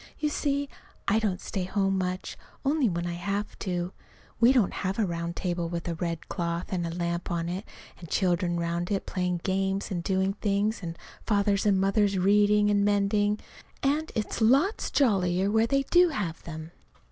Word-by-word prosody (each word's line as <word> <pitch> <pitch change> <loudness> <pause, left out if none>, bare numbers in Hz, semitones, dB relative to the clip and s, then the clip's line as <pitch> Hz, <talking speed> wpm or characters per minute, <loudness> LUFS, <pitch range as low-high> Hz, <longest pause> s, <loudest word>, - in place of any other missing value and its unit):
You 300 - 0
see, 285 -1 -1 0.4
I 215 +2 +4
don't 205 -5 -1
stay 195 - -4
at 180 - -5
home 195 -1 +2
much, 185 0 -3 0.3
only 280 -4 +3
when 170 -1 -2
I 175 - -2
have 200 +4 -3
to. 180 -1 -2 0.5
We 235 +2 +7
don't 245 -8 +3
have 190 0 -2
a 220 - +2
round 170 -1 -3
table 175 -2 -2
with 170 0 -4
a 170 - -1
red 165 0 -4
cloth 170 0 -3
and 175 -2 -1
a 165 - -5
lamp 170 0 -2
on 170 -1 -1
it, 185 +4 -4 0.3
and 170 - -10
children 175 -1 +1
'round 170 +1 -2
it 200 -2 -1
playing 180 -2 -1
games 195 +1 -1
and 175 -2 -1
doing 190 +1 +1
things, 205 +1 0
and 165 -2 -5 0.3
fathers 200 -1 +2
and 195 -2 +4
mothers 195 0 +2
reading 205 +2 +4
and 205 0 +3
mending. 205 +1 +2 0.4
And 295 +3 +1
it's 220 +1 -2
lots 275 - +3
jollier 195 -6 +2
where 220 +1 +3
they 275 +2 +2
do 355 +5 +5
have 195 - -3
them. 160 0 -7
195 Hz, 185 wpm, -28 LUFS, 175-210 Hz, 0.5 s, We